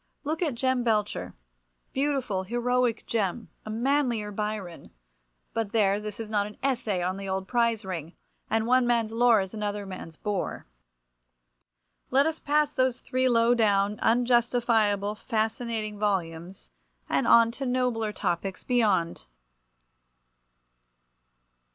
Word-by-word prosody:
Look 310 +3 -2
at 305 -8 0
Jem 260 0 +1
Belcher—beautiful, 205 - -3
heroic 240 +3 0
Jem, 220 0 -2 0.2
a - - -5
manlier 235 -2 0
Byron—but 170 - -6
there, 205 -2 +3
this 210 0 -7
is 225 - -4
not 205 -1 0
an 210 - -12
essay 230 -9 0
on 185 +2 -1
the 195 0 -6
old 190 0 -2
prize 235 -3 +1
ring, 170 -3 -5 0.4
and 220 0 +1
one 250 +1 +3
man's 230 -2 +1
lore 230 -2 +4
is 190 +1 -6
another 210 -1 -3
man's 185 -4 -8
bore. 205 +2 -3 1.4
Let 275 +2 +4
us 320 0 -1
pass 295 0 +1
those 255 -2 +1
three 255 0 0
low 235 0 +4
down, 205 -3 +2
unjustifiable, 230 -4 +2
fascinating 220 -1 -2
volumes, 180 - -3 0.4
and - - +1
on 230 0 +6
to 270 +3 -4
nobler 245 -4 0
topics 185 0 -3
beyond! 200 - +1
220 Hz, 120 wpm, -27 LUFS, 195-245 Hz, 1.4 s, on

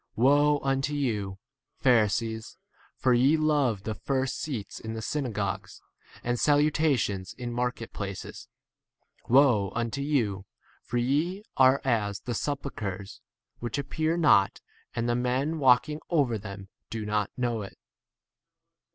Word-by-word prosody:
Woe 145 +4 +4
unto 135 +2 0
you, 105 -9 -1 0.4
Pharisees, 110 -2 +1 0.4
for 130 - +2
ye 135 +6 +4
love 145 -10 +1
the 110 - -2
first 135 +4 -2
seats 125 -10 -5
in 110 0 -6
the 110 - -4
synagogues 105 -10 -3 0.4
and 120 0 -1
salu 150 0 +4
44 160 +1 +2
tations 95 -5 -3
in 120 -1 -5
market 125 -1 -3
places. 100 -2 -6 0.8
Woe 120 -7 +5
unto 120 +3 -2
you, 115 -10 0 0.4
ff - - -34
for 120 - 0
ye 150 +11 0
are 130 +1 +5
as 105 -6 0
the 125 - -5
sepul 140 +3 -2
chres 100 -2 -5 0.4
which 120 +4 -3
appear 155 +4 -1
not, 150 - +4 0.4
and 115 0 -1
the 120 - +2
men 130 +6 0
walking 135 +3 +4
over 135 -10 +2
them 100 -1 -9 0.2
do 110 -2 -4
not 105 0 0
45 - - -46
know 120 -3 -1
it. 100 - -9
120 Hz, 145 wpm, -28 LUFS, 105-140 Hz, 0.8 s, Woe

